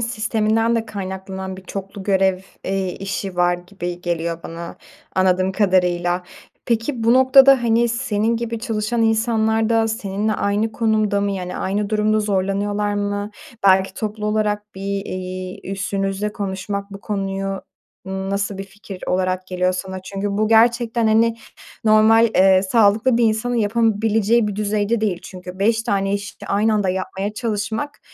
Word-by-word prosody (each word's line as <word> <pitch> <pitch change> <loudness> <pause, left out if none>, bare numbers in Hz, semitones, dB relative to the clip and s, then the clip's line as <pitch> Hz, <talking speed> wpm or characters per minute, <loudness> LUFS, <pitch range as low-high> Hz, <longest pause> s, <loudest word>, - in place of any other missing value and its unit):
sisteminden 225 0 +1
de 225 - -2
kaynaklanan 190 -2 -6
bir 190 - -11
çoklu 195 +1 -7
görev, 190 -1 +2 0.3
eee, 190 -1 -2
işi 195 -1 -4
var 175 0 +3
gibi 175 -1 -6
geliyor 170 -1 -2
bana 170 +1 -7 0.4
anladığım 185 0 +2
kadarıyla. 180 -3 +1 0.4
Peki 230 +1 -1
bu 230 - +5
noktada, 265 0 +7
hani, 235 +1 +3
senin 230 -1 0
gibi 230 0 -3
çalışan 225 0 -1
insanlar 220 0 +2
da 225 -1 +2
seninle 215 -1 -2
aynı 210 +2 0
konumda 215 -3 +1
mı 200 - 0
yani 180 -2 -4
aynı 200 +2 -2
durumda 215 0 +2
zorlanıyorlar 205 +1 0
mı? 205 0 -2 0.4
Belki 190 0 +4
toplu 215 -1 -4
olarak 210 -1 -1
bir, 195 +1 -3
iii, 185 0 -6
üstünüzle 195 +1 -2
konuşmak 200 0 -4
bu 195 - -8
konuyu 195 -1 -3 0.4
n 190 0 -4
nasıl 200 0 -2
bir 195 - -4
fikir 195 -1 -11
olarak 185 0 0
geliyor 180 0 0
sana? 190 0 -5
Çünkü 195 +2 -4
bu 215 0 +2
gerçekten, 230 0 +3
hani, 225 +1 +3 0.5
normal, 220 +1 +5
eee, 190 0 +5
sağlıklı 220 +4 +3
bir 240 - +4
insanın 225 +2 +1
yapabileceği 225 0 +2
bir 200 - -5
düzeyde 210 +1 0
değil 200 -5 0
çünkü 180 0 -9
5 225 +3 +2
tane 195 -3 0
iş 200 +1 -5
aynı 215 +2 +2
anda 205 -3 +1
yapmaya 190 +2 -3
çalışmak, 220 +4 -3
205 Hz, 145 wpm, -20 LUFS, 190-220 Hz, 0.5 s, noktada